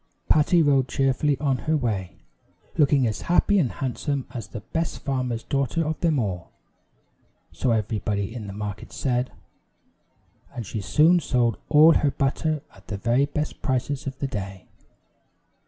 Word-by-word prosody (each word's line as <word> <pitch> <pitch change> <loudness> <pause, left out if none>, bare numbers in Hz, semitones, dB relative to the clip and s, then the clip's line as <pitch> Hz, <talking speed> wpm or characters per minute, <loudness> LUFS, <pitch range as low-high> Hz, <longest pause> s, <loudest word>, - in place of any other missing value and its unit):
Patty 160 +2 +4
rode 135 -3 +3
cheerfully 135 +2 +1
on 135 -2 +1
her 160 - +4
way, 105 -9 -2 0.6
looking 145 -4 +4
as 110 -2 -2
happy 195 +3 +3
and 135 -9 +1
handsome 135 +1 -3
as 115 -5 -5
the 110 - -7
best 165 +9 -3
farmer's 125 -4 -2
daughter 140 +4 0
of 155 +1 -2
them 165 -4 +2
all 95 -8 -2 1.0
so 130 - -1
everybody 105 -2 -1
in 110 -4 -6
the - - -6
market 105 0 -6
said 125 -1 -1 1.2
and 120 - -4
she 105 +2 -4
soon 160 - +4
sold 120 -7 +1
all 155 +2 +7
her 145 - +2
butter 145 +2 -1
at 95 0 -19
the 105 - -4
very 120 +7 +2
best 150 +1 -4
prices 130 +1 -1
of 135 0 -5
the 140 - -2
day. 100 -6 -6
130 Hz, 155 wpm, -25 LUFS, 110-150 Hz, 1.2 s, all